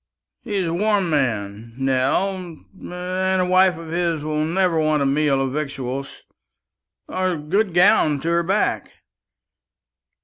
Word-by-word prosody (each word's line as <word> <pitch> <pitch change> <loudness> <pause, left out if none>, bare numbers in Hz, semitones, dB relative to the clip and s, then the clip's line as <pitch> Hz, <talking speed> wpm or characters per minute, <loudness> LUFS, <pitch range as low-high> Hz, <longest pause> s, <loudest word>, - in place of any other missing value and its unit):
He's 205 -6 -2
a 165 - -2
warm 200 -1 +1
man, 115 -5 -2
Nell, 135 +9 +1
and 180 0 -11 0.5
a 180 - +1
wife 185 -1 +4
of 165 -1 -9
his 170 -3 -1
will 155 0 -1
never 170 +1 +1
want 155 -2 +1
a - - 0
meal 140 0 +1
of 135 -1 -2
victuals 140 -2 -5 0.8
or 185 0 -1
a - - -4
good 180 +5 -1
gown 175 -5 +4
to 165 - -2
her 170 0 +2
back. 195 +5 -1
160 Hz, 140 wpm, -21 LUFS, 140-185 Hz, 0.8 s, wife